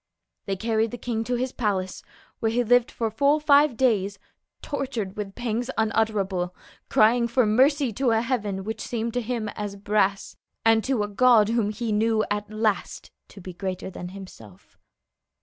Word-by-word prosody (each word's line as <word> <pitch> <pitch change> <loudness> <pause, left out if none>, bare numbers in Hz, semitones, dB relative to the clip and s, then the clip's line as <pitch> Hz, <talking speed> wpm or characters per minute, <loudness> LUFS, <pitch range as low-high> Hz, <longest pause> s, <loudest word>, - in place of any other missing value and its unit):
They 195 - -1
carried 225 +2 0
the 245 - -7
king 230 -2 -3
to 245 - -1
his 255 +1 -2
palace, 195 -7 -2 0.4
where 225 - 0
he 245 +2 +1
lived 245 +1 +3
for 225 -2 -3
full 280 +7 +3
five 290 -3 +4
days, 205 -6 +1 0.5
tortured 245 -9 -4
with 200 -2 -6
pangs 240 0 -2
unutterable, 205 -5 0 0.3
crying 235 +2 +4
for 250 0 +2
mercy 260 +3 +3
to 260 +4 0
a 225 -1 +3
heaven 210 -6 -2
which 220 +2 -5
seemed 230 -1 -3
to 245 - 0
him 230 -2 -3
as 205 -1 -5
brass, 200 -1 0 0.3
and 225 -1 +4
to 260 -5 +1
a - - -2
God 220 0 +4
whom 230 -3 +1
he 220 +1 -3
knew 215 +1 +2
at 205 0 -2
last 215 -1 -2 0.2
to - - -14
be 185 -1 -8
greater 185 +1 -5
than 180 -1 -7
himself. 180 - -13
220 Hz, 170 wpm, -25 LUFS, 205-245 Hz, 0.5 s, five